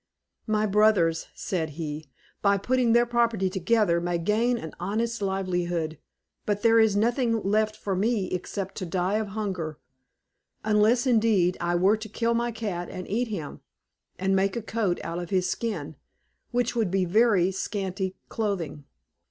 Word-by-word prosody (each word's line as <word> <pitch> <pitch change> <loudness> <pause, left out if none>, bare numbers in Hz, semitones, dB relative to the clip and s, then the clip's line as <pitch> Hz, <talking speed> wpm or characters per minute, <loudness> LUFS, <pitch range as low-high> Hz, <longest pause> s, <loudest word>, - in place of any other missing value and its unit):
"My 215 0 +2
brothers," 195 -6 +3
said 160 -5 -2
he, 155 -2 -5 0.3
"by 200 0 +4
putting 245 +2 +2
their 240 0 +5
property 230 -5 +1
together, 190 -2 +2
may 175 0 0
gain 220 +8 +1
an 160 -8 -7
honest 225 +5 -2
livelihood, 175 -5 -1 0.4
but 205 -1 -2
there 230 0 +6
is 220 -2 +4
nothing 230 +2 +2
left 215 +2 +1
for 195 -2 -2
me 205 -1 0
except 190 +1 -4
to 185 - -3
die 185 +4 0
of 215 - -2
hunger; 180 -8 -3 0.9
unless, 215 +4 +3
indeed, 215 -7 +3
I 175 0 0
were 190 +5 +4
to 215 0 -8
kill 230 +2 0
my 235 +1 0
cat 200 -6 -4
and 185 -1 -7
eat 240 +4 0
him, 180 -10 -6 0.6
and 190 +1 +1
make 195 0 +1
a 235 - -3
coat 215 -6 -1
out 170 +1 -4
of 175 - -6
his 185 -2 +1
skin, 160 - -3 0.5
which 245 0 0
would 225 -5 +1
be 190 0 +1
very 195 -1 +3
scanty 190 -1 -3
clothing." 175 -10 -3
200 Hz, 160 wpm, -26 LUFS, 180-225 Hz, 0.9 s, there